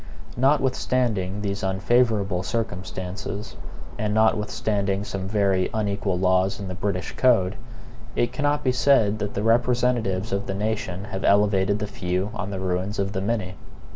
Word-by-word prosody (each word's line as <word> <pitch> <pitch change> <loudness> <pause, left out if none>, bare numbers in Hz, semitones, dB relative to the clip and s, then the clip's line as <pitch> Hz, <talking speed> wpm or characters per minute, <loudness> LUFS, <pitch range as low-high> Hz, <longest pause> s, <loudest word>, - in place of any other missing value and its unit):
Notwithstanding 125 -7 +1
these 100 -1 -3
unfavorable 100 0 +2
circumstances, 95 -1 -4 0.4
and 105 0 0
notwithstanding 105 -2 +1
some 95 -2 -4
very 100 -2 +1
unequal 100 -3 -1
laws 95 +1 +2
in 100 - -5
the - - -3
British 95 0 -2
code, 110 -7 +3 0.6
it 120 - 0
cannot 145 0 0
be 130 - +3
said 125 -5 +3
that 105 -1 -3
the 100 - -1
representatives 115 -4 +1
of 100 +1 -2
the 95 - -2
nation 100 -3 -2
have 95 -2 -5
elevated 100 -1 +3
the 105 - -3
few 95 0 -2
on 95 -3 -4
the 95 -2 -4
ruins 95 +2 -2
of 100 0 -1
the 95 - -2
many. 100 -3 -1
100 Hz, 145 wpm, -24 LUFS, 95-110 Hz, 0.6 s, code